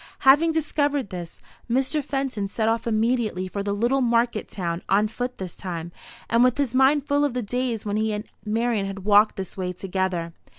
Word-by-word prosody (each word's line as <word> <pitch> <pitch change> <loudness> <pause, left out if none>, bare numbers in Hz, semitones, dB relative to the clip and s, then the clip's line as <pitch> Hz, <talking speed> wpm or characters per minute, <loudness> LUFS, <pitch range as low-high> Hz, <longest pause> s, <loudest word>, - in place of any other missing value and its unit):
Having 295 +5 +6
discovered 290 -5 0
this, 175 -2 -8 0.3
Mr. 270 +5 +1
Fenton 260 -7 -2
set 220 +2 -1
off 230 +2 0
immediately 220 -4 0
for 200 +2 -4
the 200 0 -2
little 240 +7 +1
market 235 -2 +1
town, 170 -2 -3
on 205 +2 +4
foot 245 +3 -4
this 185 -3 -6
time, 170 -2 -5 0.4
and 235 +1 +4
with 250 0 +3
his 275 -4 0
mind 265 +2 +4
full 285 0 +2
of 285 -4 0
the 250 - -1
days 240 0 -2
when 205 0 -1
he 220 0 +1
and 210 +1 -3 0.2
Marian 220 -1 0
had 195 -1 -7
walked 210 +1 +5
this 190 -2 -6
way 185 -1 -2
together. 180 -2 -2
225 Hz, 195 wpm, -24 LUFS, 195-255 Hz, 0.4 s, Having